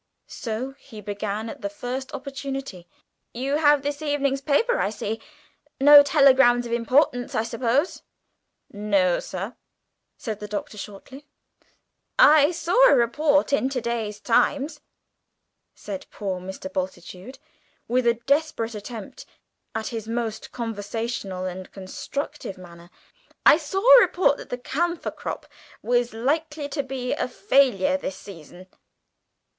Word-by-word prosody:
So 235 +4 -5
he 225 -5 -12
began 205 +1 -4
at - - -8
the 200 - -3
first 250 +6 -5
opportunity: 270 -9 -6 0.5
"You 270 +4 -1
have 295 -2 +4
this 290 +1 -3
evening's 280 -2 0
paper, 455 - +2
I - - +1
see. 215 +1 -4 0.6
No 290 +1 +10
telegrams 265 -4 +5
of 235 - -6
importance, 245 +2 +1
I 220 - +1
suppose?" 235 +7 0 0.7
"No, 200 -4 +1
sir," 195 +6 -6 0.6
said 215 -3 -5
the 210 - -6
Doctor 210 +1 -5
shortly. 260 +9 -10 0.9
"I 310 -12 +7
saw 355 +9 +4
a - - +6
report 285 +5 +2
in 265 -1 +2
to 270 -2 -2
day's 225 -3 -3
Times," 275 +7 +1 0.9
said 195 -3 -7
poor 190 -3 -4
Mr. 190 +1 -7
Bultitude, 185 +5 -6 0.5
with 250 0 +1
a 235 - +4
desperate 270 -2 0
attempt 215 0 -8 0.5
at 220 -1 -2
his 225 -2 -6
most 230 -1 -4
conversational 225 -4 -4
and 185 0 -6
instructive 200 +4 -6
manner, 170 -1 -13 0.6
"I - - +8
saw 340 +4 -3 0.2
a - - +8
report 350 -10 +3
that - - -11
the 245 - -3
camphor 340 +7 -2
crop - - -6 0.4
was 245 0 +1
likely 295 +6 -2
to 285 0 -1
be 265 -2 -3
a - - -1
failure 280 -2 +2
this 190 -9 -5
season. 180 -1 -12
245 Hz, 130 wpm, -24 LUFS, 210-285 Hz, 0.9 s, No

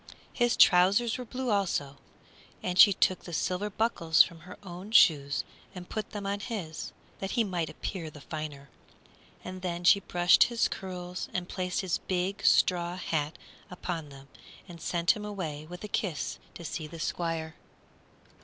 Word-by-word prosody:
His 240 -1 +2
trousers 200 +7 +5
were 250 - -5
blue, 255 +1 -3
also, 170 -9 0 0.7
and 180 0 -2
she 205 - +10
took 185 -1 +1
the 175 - -8
silver 185 +6 -1
buckles 195 -7 +4
from 170 -1 -9
her 180 +3 -12
own 185 +2 -8
shoes 145 -10 +4 0.3
and 180 -1 -8
put 215 -1 -4
them 205 -1 -6
on 200 +1 -1
his, 200 -8 -5 0.3
that 195 0 -4
he 235 - +5
might 175 -6 -2
appear 165 -1 -5
the 150 - -12
finer. 145 -2 -7 0.7
And 185 0 -7
then 175 -1 -3
she 190 +3 +6
brushed 175 -2 +5
his 235 -1 +1
curls 180 -1 -6
and 180 -1 -2
placed 180 -1 -2
his 185 -3 -1
big 185 +2 -2
straw 175 -1 +3
hat 155 -4 -2 0.3
upon 175 -4 -5
them 135 -1 -13 0.4
and 170 -2 -11
sent 170 -2 +2
him 210 - -4
away 165 -8 -5
with 180 +2 -9
a - - -4
kiss 190 -6 -2 0.2
to 170 - -9
see 155 -1 -4
the 165 +2 -10
Squire. 165 -1 -2
180 Hz, 165 wpm, -29 LUFS, 160-195 Hz, 0.7 s, she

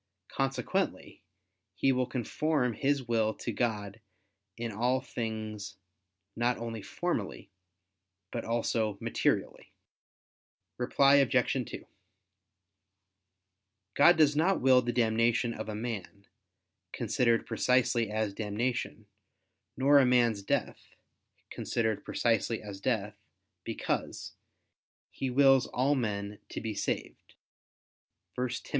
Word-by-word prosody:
Consequently 135 0 -2 0.5
he 135 - +2
will 125 -1 0
conform 130 +1 0
his 140 0 0
will 110 -2 +1
to 120 - -4
God 105 -2 -2 0.6
in 115 -1 -3
all 120 +5 +1
things 110 -5 -5 0.6
not 120 +1 +1
only 115 -1 -5
formally, 95 - -4 0.8
but - - -3
also 115 -2 -1
materially. - - -1 1.1
Reply 140 +3 +4
Obj. 130 -2 +3 0.2
2: - - -8 2.1
God 170 +4 +6
does 150 -2 +4
not 175 +6 +2
will 130 0 +5
the 120 -1 -2
damnation 115 0 +2
of 110 -1 -6
a 105 - -4
man, 105 -3 -6 0.7
considered 115 -2 +1
precisely 120 -3 +1
as 110 -1 -1
damnation, 110 +1 -3 0.7
nor 140 +2 +6
a 135 - +5
man's 120 -4 +3
death, 100 - -3 0.6
considered 110 -3 -1
precisely 115 -1 0
as 100 -2 -8
death, 105 -5 -1 0.5
because, - - -3 0.8
"He 135 - -3
wills 135 0 +5
all 135 +4 +1
men 105 -5 -2
to - - -5
be 110 -1 -4
saved" 100 - -4 1.0
(1 125 0 -1
Tim. 120 - -3
120 Hz, 105 wpm, -30 LUFS, 110-130 Hz, 2.1 s, God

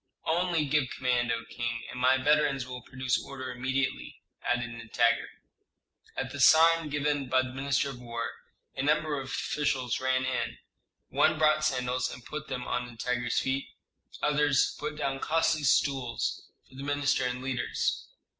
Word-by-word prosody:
"Only 170 -1 +1
give 145 -2 +1
command, 125 -2 0
O 115 0 -2
king, 115 -1 -4
and 125 - -7
my 130 +1 +5
veterans 145 -1 +2
will 125 0 -7
produce 130 0 -1
order 130 -2 -6
immediately," 130 +2 -2 0.2
added 120 -1 -1
Nitager. 115 0 +1 0.9
At - - -3
a - - -6
sign 165 0 +6
given 145 -2 -1
by 130 0 +4
the 130 0 -7
minister 140 +1 0
of 125 - -10
war, 115 -1 -4 0.4
a - - -2
number 150 0 +1
of 135 - -8
officials 135 -3 -1
ran 130 0 +1
in: 130 -1 -2 0.5
one 155 0 +3
brought 155 0 +3
sandals 125 -3 0
and 125 - -10
put 150 +4 -6
them 125 -2 -4
on 125 0 -2
Nitager's 120 0 -2
feet; 135 +1 0 0.6
others 145 -2 +3
put 150 +1 -4
down 135 -2 -1
costly 165 +1 +1
stools 135 -3 0 0.2
for - - -22
the 135 +1 -8
minister 145 -1 +1
and 125 0 -2
leaders. 130 -2 -1
130 Hz, 155 wpm, -29 LUFS, 125-150 Hz, 0.9 s, sign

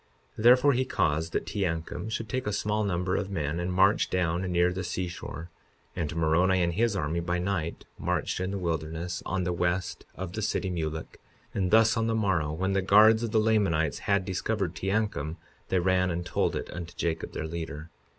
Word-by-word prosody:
52:22 110 - -6
Therefore 125 +4 +7
he 130 +1 +2
caused 80 - 0
that - - -1
Teancum 90 -1 -3
should 110 0 -3
take 130 0 -3
a - - +1
small 105 +1 0
number 90 -2 0
of 100 -1 -2
men 80 -3 -2
and 90 +1 -2
march 95 +3 +3
down 90 -1 0
near 90 0 +3
the 95 +1 -3
seashore; 90 -2 -5 0.4
and 80 -2 -3
Moroni 85 +3 +3
and 85 0 0
his 110 +3 +1
army, 85 -2 -1
by 85 +1 -1
night, 90 -3 -2
marched - - -1
in 95 0 -1
the 100 - -3
wilderness, 85 0 -3
on 95 0 -1
the 90 0 -1
west 90 0 -1
of 90 -1 -6
the 110 - -3
city 100 -2 -1
Mulek; 80 -2 -4 0.3
and 95 -2 0
thus, 110 +2 +5
on 115 0 +1
the 115 - +1
morrow, 95 -9 +1
when 95 +5 -1
the 95 - +2
guards 110 +4 +6
of 115 - -1
the 110 - +2
Lamanites 100 -8 +2
had 100 -1 +1
discovered 95 -1 -1
Teancum, 95 -5 -1 0.3
they 95 - +2
ran 95 +1 +2
and 85 0 -3
told - - 0
it - - -5
unto 85 -1 -7
Jacob, 80 -1 -2
their 80 - -3
leader. 80 -1 -6
90 Hz, 200 wpm, -28 LUFS, 85-100 Hz, 0.4 s, Therefore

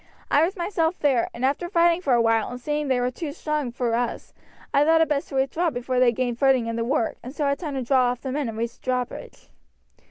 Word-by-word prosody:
I 290 - +5
was 365 +5 0
myself 345 -1 0
there, 265 -5 +1
and 240 +2 -3
after 290 +6 -1
fighting 340 -1 +3
for 275 -8 +1
a 235 - +3
while 225 -1 +2
and 245 - -7
seeing 295 +3 -2
they 260 -2 +2
were 250 0 0
too 295 +3 -5
strong 300 -4 -3
for 240 -1 -1
us, 235 0 -2 0.4
I 280 - +5
thought 325 +2 +4
it 325 - +3
best 290 -2 -1
to - - -7
withdraw 295 +6 +1
before 250 -2 -2
they 250 -1 +5
gained 245 0 -2
footing 265 -3 +3
in 230 0 -3
the 230 - -1
work, 235 -1 0
and 255 +4 -9
so 295 - -1
had 280 0 0
time 300 -6 -4
to 265 - -2
draw 255 +1 +3
off 245 0 -1
the 265 - -4
men 280 -2 -2
and 220 - -7
raise 230 +1 -3
the - - -46
drawbridge." 255 -1 -4
265 Hz, 260 wpm, -24 LUFS, 245-300 Hz, 0.4 s, I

